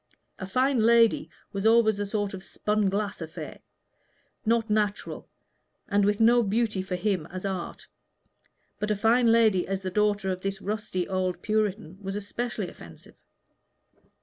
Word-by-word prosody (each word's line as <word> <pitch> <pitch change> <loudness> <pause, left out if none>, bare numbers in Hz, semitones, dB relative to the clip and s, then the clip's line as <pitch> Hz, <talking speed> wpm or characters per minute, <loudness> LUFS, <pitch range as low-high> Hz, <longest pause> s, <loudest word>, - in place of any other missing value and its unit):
A 190 - -5
fine 255 +5 +2
lady 230 0 +4 0.2
was 195 0 -3
always 220 -2 +4
a 205 - -2
sort 205 -1 -2
of 190 -1 -7
spun 210 0 0
glass 200 -1 -2
affair 160 -1 -7 0.9
not 230 0 +2
natural, 210 -1 -1 0.6
and 205 0 +2
with 205 0 +1
no 235 +2 +5
beauty 215 -1 0
for 185 -1 -4
him 185 -3 -1
as 185 +2 -7
art; 190 -3 -4 0.9
but 210 0 -2
a 210 - +2
fine 230 +3 +4
lady 220 -5 +4
as 195 0 -3
the 185 - -3
daughter 205 -1 +1
of 185 0 -4
this 195 0 -3
rusty 205 -3 -3
old 185 -2 -2
Puritan 210 -4 -1
was 195 0 -4
especially 210 0 -3
offensive. 85 - -13
205 Hz, 150 wpm, -27 LUFS, 190-220 Hz, 0.9 s, no